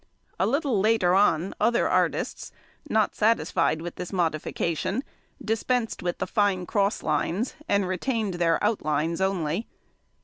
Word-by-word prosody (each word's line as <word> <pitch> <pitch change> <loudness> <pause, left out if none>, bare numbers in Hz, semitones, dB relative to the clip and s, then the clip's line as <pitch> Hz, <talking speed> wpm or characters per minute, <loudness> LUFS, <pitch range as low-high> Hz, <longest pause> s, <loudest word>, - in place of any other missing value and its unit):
A - - +2
little 275 -4 +1
later 210 -3 +3
on 190 -2 +3
other 235 +2 +3
artists, - - 0 0.4
not 215 -1 +2
satisfied 185 -7 +1
with 175 - -7
this 180 - -6
modification, 170 - -1 0.4
dispensed 225 +1 -1
with 175 -1 -2
the - - -2
|114| - - -16
fine 200 -4 +2
cross 200 +1 0
lines, 170 - -1 0.2
and 200 -2 +2
retained 210 +2 -1
their 170 -1 +2
outlines 165 -5 0
only. 190 +1 -1
195 Hz, 135 wpm, -26 LUFS, 170-220 Hz, 0.4 s, later